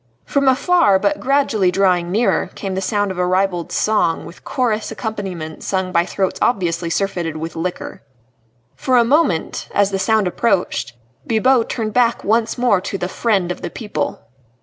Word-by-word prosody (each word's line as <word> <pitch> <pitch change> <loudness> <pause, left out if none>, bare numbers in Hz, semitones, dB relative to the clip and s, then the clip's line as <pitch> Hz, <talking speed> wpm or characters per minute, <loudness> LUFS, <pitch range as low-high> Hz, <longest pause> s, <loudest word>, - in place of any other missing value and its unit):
From 280 -1 0
afar, 275 - +4
but 300 +10 0
gradually 260 -8 +2
drawing 180 -2 +1
nearer, 225 +5 +1
came 195 -2 -4
the 190 - -2
sound 205 +1 0
of 185 - -6
a 180 - +2
ribald 185 -2 0
song, 180 -6 +1
with 170 - -13
chorus 225 -5 -1
accompaniment 195 -8 -5
sung 190 -1 -1
by 170 0 +2
throats 190 -2 -2
obviously 175 -6 0
surfeited 170 -3 -2
with 160 +1 -6
liquor. 175 +2 -5 0.7
For 255 -1 +1
a 240 - +6
moment 265 - +1
as 200 0 +3
the 195 - -1
sound 215 +2 +2
approached 180 - 0 0.3
Bibot 235 +1 +2
turned 220 -3 -3
back 240 -1 +2
once 225 +2 +1
more 240 -6 +2
to 195 +1 -4
the 180 - -3
Friend 190 -3 0
of - - -6
the - - -4
People. 205 - -4
195 Hz, 170 wpm, -19 LUFS, 180-230 Hz, 0.7 s, a